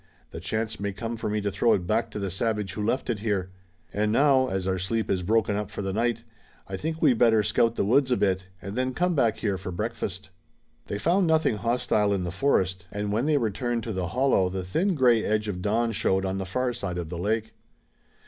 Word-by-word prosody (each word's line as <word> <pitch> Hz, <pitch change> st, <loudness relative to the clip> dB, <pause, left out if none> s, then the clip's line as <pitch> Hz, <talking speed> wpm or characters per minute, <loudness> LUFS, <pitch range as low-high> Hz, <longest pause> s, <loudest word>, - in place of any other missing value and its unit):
"The -, -, -7 dB
chance 110 Hz, 0 st, -3 dB
may 100 Hz, 0 st, -2 dB
come 115 Hz, +3 st, -4 dB
for 110 Hz, -, -3 dB
me 105 Hz, 0 st, -1 dB
to 100 Hz, 0 st, -1 dB
throw 105 Hz, +4 st, +3 dB
it 90 Hz, -, 0 dB
back 110 Hz, +4 st, 0 dB
to 105 Hz, -, -7 dB
the 100 Hz, -2 st, -3 dB
savage 105 Hz, 0 st, -1 dB
who 105 Hz, -, -4 dB
left 120 Hz, +5 st, 0 dB
it 115 Hz, -4 st, -1 dB
here. 100 Hz, -4 st, -1 dB, 0.4 s
And 105 Hz, +1 st, +1 dB
now, 135 Hz, +1 st, +4 dB
as 95 Hz, -5 st, -2 dB
our 95 Hz, -1 st, 0 dB
sleep 110 Hz, +4 st, -1 dB
is 95 Hz, -, +1 dB
broken 110 Hz, +2 st, +1 dB
up 105 Hz, -1 st, -3 dB
for 100 Hz, -1 st, -5 dB
the 95 Hz, 0 st, -2 dB
night, 115 Hz, +1 st, 0 dB, 0.4 s
I 95 Hz, -, -4 dB
think 160 Hz, +9 st, -3 dB
we'd 130 Hz, -7 st, +4 dB
better 110 Hz, -3 st, +5 dB
scout 115 Hz, +3 st, +2 dB
the -, -, 0 dB
woods 130 Hz, +5 st, +3 dB
a 125 Hz, -, +2 dB
bit, 95 Hz, -1 st, 0 dB, 0.2 s
and 100 Hz, +1 st, -6 dB
then 130 Hz, 0 st, -1 dB
come 180 Hz, 0 st, +1 dB
back 115 Hz, -7 st, +2 dB
here 100 Hz, -4 st, -1 dB
for 95 Hz, -1 st, -6 dB
breakfast." 100 Hz, -1 st, -4 dB, 0.6 s
They 100 Hz, -, -3 dB
found 175 Hz, -, +2 dB
nothing 160 Hz, -8 st, +2 dB
hostile 115 Hz, -2 st, +1 dB
in 95 Hz, -2 st, -1 dB
the 90 Hz, -, -3 dB
forest, 95 Hz, -4 st, 0 dB
and 105 Hz, 0 st, -3 dB
when 115 Hz, +7 st, 0 dB
they 155 Hz, -2 st, +3 dB
returned 115 Hz, 0 st, -1 dB
to 110 Hz, -, -4 dB
the 95 Hz, -2 st, -2 dB
hollow 125 Hz, -5 st, +2 dB
the 95 Hz, 0 st, -4 dB
thin 170 Hz, -, 0 dB
gray 120 Hz, -5 st, +4 dB
edge 105 Hz, 0 st, 0 dB
of 90 Hz, -3 st, -3 dB
dawn 115 Hz, +4 st, +1 dB
showed 95 Hz, -2 st, +1 dB
on 95 Hz, 0 st, -2 dB
the 95 Hz, -, -4 dB
far 125 Hz, +6 st, -1 dB
side 100 Hz, -6 st, -4 dB
of 85 Hz, -3 st, -4 dB
the 85 Hz, -1 st, -5 dB
lake. 110 Hz, +4 st, -1 dB
105 Hz, 235 wpm, -26 LUFS, 95-120 Hz, 0.6 s, better